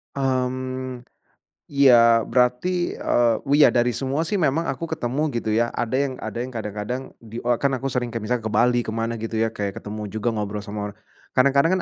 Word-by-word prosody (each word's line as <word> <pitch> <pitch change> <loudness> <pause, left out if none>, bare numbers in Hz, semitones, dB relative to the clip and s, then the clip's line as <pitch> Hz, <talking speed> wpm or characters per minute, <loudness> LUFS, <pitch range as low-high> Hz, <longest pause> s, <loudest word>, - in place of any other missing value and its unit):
Mmm. 130 -1 -2 0.6
Iya, 120 -5 +6
berarti, 125 +9 +1
eee, 120 -2 +2 0.2
iya 150 - +6
dari 120 0 +3
semua 135 +5 -1
sih, 200 +5 -1
memang 165 0 +1
aku 165 +5 -3
ketemu 140 +1 -2
gitu 115 -2 -2
ya, 115 +2 +1
ada 120 +2 -1
yang 140 -1 0
ada 110 +1 -5
yang 125 +2 -4
kadang-kadang 105 +2 -4 0.2
di 115 +1 -8
e 120 - -3
kan 140 +1 +1
aku 135 +1 -2
sering 125 -2 -2
kayak 115 - -3
misalnya 115 +1 -2
ke 110 - -2
Bali, 120 +3 +4
ke 110 - -4
mana 115 +1 -2
gitu 115 +1 -6
ya, 115 - +2
kayak 100 -3 -4
ketemu 105 +1 -6
juga 110 +3 -2
ngobrol 105 -2 -3
sama 105 0 -5
orang. 105 - -33 0.4
Kadang-kadang 140 +8 +3
120 Hz, 195 wpm, -23 LUFS, 110-135 Hz, 0.6 s, Iya